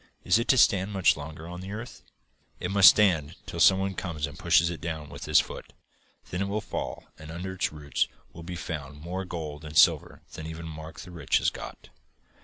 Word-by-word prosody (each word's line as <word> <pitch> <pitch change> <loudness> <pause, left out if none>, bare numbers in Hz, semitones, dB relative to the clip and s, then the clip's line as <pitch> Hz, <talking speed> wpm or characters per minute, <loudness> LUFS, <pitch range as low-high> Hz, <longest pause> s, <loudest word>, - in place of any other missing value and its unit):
Is 90 +5 +4
it 115 - -2
to 130 - +4
stand 100 -3 +4
much 95 -2 +4
longer 80 +2 -8
on 90 +1 -7
the 95 +2 -7
earth?"' 110 +3 -8 0.6
'It 90 - -3
must 100 0 +9
stand 85 -7 +2
till 90 -3 -6
some 95 +4 +7
one 95 0 -1
comes 85 -6 -3
and 75 -1 -9
pushes 85 +3 +3
it 85 - -7
down 80 -3 -5
with - - -8
his - - +5
foot. - - -6 0.6
Then 90 - -2
it 100 - 0
will 105 +2 -1
fall, 95 -5 -5 0.2
and 80 0 -10
under 90 +3 -5
its 95 - -1
roots 75 -1 -1 0.3
will 85 - -10
be 90 +1 -6
found 75 -4 -6
more 90 +4 -5
gold 80 -5 -6
and 75 0 -5
silver - - +4
than 80 - -7
even 80 +1 -7
Mark 80 0 -9
the 90 -2 -11
Rich 85 - +1
has - - +1
got. - - -10
85 Hz, 215 wpm, -27 LUFS, 80-95 Hz, 0.6 s, must